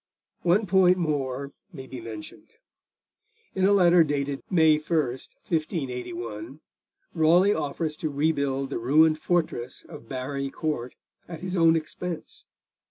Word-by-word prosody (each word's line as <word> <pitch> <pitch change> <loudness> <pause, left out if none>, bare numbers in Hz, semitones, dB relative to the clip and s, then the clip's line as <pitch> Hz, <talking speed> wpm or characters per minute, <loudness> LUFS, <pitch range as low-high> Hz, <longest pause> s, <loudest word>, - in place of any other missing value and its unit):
One 185 +5 +3
point 185 -1 +4
more 140 -5 -2 0.2
may 135 -7 -9
be 130 -1 -8
mentioned. 110 - -10 1.0
In 190 -1 +1
a 200 - +4
letter 180 -3 +6
dated 140 -2 -2
May 160 -4 +4
1, 160 +2 -1
1581, 125 - -4 0.5
Raleigh 175 +5 +4
offers 150 0 -3
to 155 - -2
rebuild 140 -2 0
the - - -2
ruined 155 +6 +4
fortress 155 -8 -2
of 115 - -12
Barry 135 +1 -3
Court 135 -5 -3 0.3
at 165 -2 -8
his 185 +1 -4
own 165 -2 +5
expense. 165 +1 -5
155 Hz, 125 wpm, -26 LUFS, 135-170 Hz, 1.0 s, letter